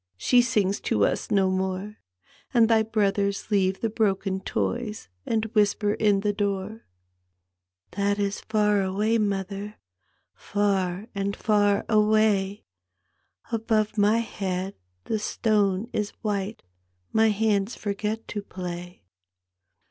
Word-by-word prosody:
She 245 - +4
sings 210 -5 +1
to 100 -1 +1
us - - -1
no 195 -2 +3
more; 190 +2 -2 0.6
And 230 -2 +6
thy 225 -1 +4
brothers 200 -2 0
leave 190 -2 +2
the 225 - 0
bioken 195 -3 0
toys 230 -3 -3 0.2
And 225 -1 +1
whisper 210 -1 +2
in 205 -2 +2
the 205 0 0
door." 200 +1 -3 1.0
That 200 +1 0
is 200 0 -1
far 210 -1 +2
atvay, 205 +4 +1
mother. 200 +1 -3 0.6
Far 195 -2 -1
and 200 0 -2
far 205 -2 +2
away/ 210 -2 +2 0.9
Above 220 -2 0
my 210 +1 +4
head 195 -4 -3 0.3
the 220 - -2
stone 210 -1 +1
is 210 -1 -1
white. 205 0 -2 0.5
My 220 0 +5
hands 210 0 +1
forget 210 +2 -3
to 205 - -3
play. 180 - -7
205 Hz, 120 wpm, -26 LUFS, 195-215 Hz, 1.0 s, And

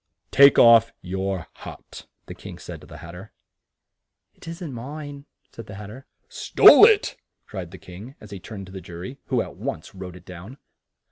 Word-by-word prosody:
"Take 140 0 +7
off 115 -1 +7
your 95 -1 -3
hat," - - -12 0.2
the - - -9
King - - -11
said - - -10
to - - -15
the - - -12
Hat 85 - -10
ter. 90 +5 -12 1.0
"It - - -17
isn't 165 -3 -7
mine," 145 +3 -8 0.2
said 115 - -11
the 100 - -9
Hat 105 0 -9
ter. 130 +4 -12 0.2
"Stole 410 - +7
it!" 435 -3 +1 0.3
cried 95 -4 -7
the 95 - -12
King, 100 +10 -12
as 105 - -14
he 100 - -7
turned 100 +1 -9
to 95 - -14
the 95 -1 -8
jury, 90 +10 -9
who 125 -4 0
at - - -12
once 80 - -6
wrote 95 -2 -9
it 90 - -15
down. 95 +8 -11
105 Hz, 190 wpm, -23 LUFS, 95-135 Hz, 1.0 s, Take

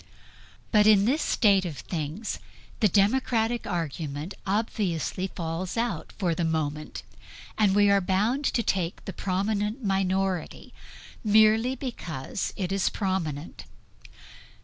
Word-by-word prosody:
But 210 -2 +5
in 205 -2 +6
this 280 +7 +2
state 200 -4 +3
of 165 -6 -5
things 160 - -4 0.4
the 215 - +5
democratic 225 +3 +1
argument 155 0 -3
obviously 195 -3 -1
falls 170 +2 -4
out 225 -9 -2
for 180 -4 +1
the 170 - -2
moment; 155 -2 -2 0.5
and 205 -3 +3
we 205 0 +5
are 200 0 +4
bound 210 +10 +1
to 235 - +1
take 180 -4 -1
the 195 - -5
prominent 205 +6 -1
minority, 190 -2 -1 0.5
merely 220 +3 +4
because 185 - -4
it 190 -2 -2
is 195 -2 +1
prominent. 175 -6 -3
195 Hz, 120 wpm, -27 LUFS, 170-215 Hz, 0.5 s, in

